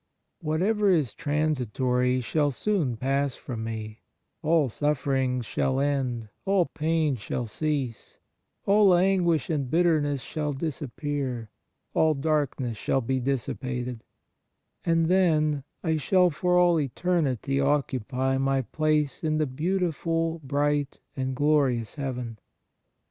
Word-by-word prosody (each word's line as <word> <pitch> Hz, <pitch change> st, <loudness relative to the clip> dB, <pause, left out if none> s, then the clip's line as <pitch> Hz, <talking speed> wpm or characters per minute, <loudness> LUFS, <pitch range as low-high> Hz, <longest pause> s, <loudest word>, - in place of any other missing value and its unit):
Whatever 195 Hz, +6 st, +1 dB
is 155 Hz, -, +2 dB
transitory 130 Hz, -4 st, 0 dB
shall 145 Hz, +5 st, +1 dB
soon 145 Hz, -, -1 dB
pass 135 Hz, +2 st, 0 dB
from 115 Hz, -3 st, -6 dB
me, 110 Hz, -1 st, -6 dB, 0.4 s
all 160 Hz, -2 st, +3 dB
sufferings 130 Hz, -2 st, 0 dB
shall 130 Hz, +4 st, 0 dB
end, 130 Hz, -5 st, -1 dB, 0.2 s
all 195 Hz, -2 st, +3 dB
pain 160 Hz, -2 st, 0 dB
shall 120 Hz, +3 st, -3 dB
cease, 135 Hz, 0 st, -3 dB, 0.5 s
all 200 Hz, -2 st, +5 dB
anguish 175 Hz, -4 st, +2 dB
and 140 Hz, -5 st, -1 dB
bitterness 155 Hz, -4 st, +2 dB
shall 150 Hz, -2 st, -3 dB
disap 150 Hz, -1 st, -4 dB
pear, 135 Hz, -7 st, -3 dB, 0.4 s
all 155 Hz, -1 st, +3 dB
darkness 135 Hz, -5 st, -1 dB
shall 135 Hz, -, 0 dB
be 130 Hz, +2 st, -1 dB
dissipated, 125 Hz, -2 st, -3 dB, 0.8 s
and 165 Hz, -1 st, +2 dB
then 155 Hz, -5 st, +2 dB, 0.2 s
I 160 Hz, -2 st, +1 dB
shall 180 Hz, +4 st, +3 dB
for 180 Hz, +4 st, +1 dB
all 175 Hz, -2 st, +4 dB
eternity 140 Hz, -, 0 dB
occupy 135 Hz, -2 st, 0 dB
my 135 Hz, 0 st, +1 dB
place 155 Hz, +2 st, 0 dB
in 155 Hz, -1 st, +1 dB
the 155 Hz, -, +2 dB
beau 155 Hz, +8 st, -1 dB
tiful, 165 Hz, -1 st, -1 dB
bright 145 Hz, 0 st, 0 dB, 0.2 s
and 130 Hz, -1 st, -2 dB
glorious 135 Hz, -6 st, +2 dB
Heaven. 125 Hz, -5 st, -5 dB
145 Hz, 120 wpm, -26 LUFS, 130-160 Hz, 0.8 s, all